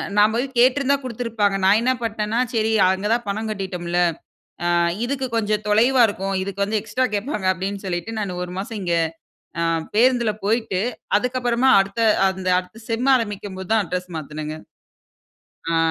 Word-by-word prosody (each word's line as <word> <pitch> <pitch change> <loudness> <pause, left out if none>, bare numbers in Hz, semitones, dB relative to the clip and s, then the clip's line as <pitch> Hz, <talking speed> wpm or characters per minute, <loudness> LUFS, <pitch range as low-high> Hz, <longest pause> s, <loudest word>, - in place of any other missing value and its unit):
நான் 210 +1 +5
போய் 245 +3 +1
கேட்டிருந்தா 270 +3 +4
குடுத்திருப்பாங்க. 230 -5 -1
நான் 200 +3 +5
என்ன 250 +2 +2
பண்ணிட்னேன்னா 220 0 -1
சரி, 220 -1 +1 0.2
அங்க 190 +2 -1
தான் 235 0 -1
பணம் 220 +2 -2
கட்டிட்டோம்ல, 180 -4 -3 0.7
அ - - +1 0.4
இதுக்கு 265 +1 -2
கொஞ்சம் 215 -1 0
தொலைவா 240 +5 +4
இருக்கும். 195 -1 -3
இதுக்கு 200 +1 -2
வந்து 210 +1 -1
எக்ஸ்ட்ரா 225 +5 -1
கேட்பாங்க 210 -1 -2
அப்டின்னு 195 +2 -5
சொல்லிட்டு, 175 +4 -3
நான் 190 -4 -3
1 180 0 -6
மாசம் 210 +3 -5
இங்க 175 -2 0 0.7
அ - - +2 0.3
பேருந்துல 240 -1 +3
போயிட்டு, 215 -3 0 0.4
அதுக்கப்பறமா 250 +1 +1
அடுத்த, 200 +4 -4 0.3
அந்த 190 -1 -5
அடுத்த 215 +5 -12
செம் 235 +4 0
ஆரம்பிக்கும் 205 -5 -3
போது 190 - -8
தான். 220 -2 +3
அட்ரஸ் 180 +1 -4
மாத்துனேங்க. 155 0 -6 1.2
அ. - - +2
210 Hz, 155 wpm, -22 LUFS, 190-235 Hz, 1.2 s, நான்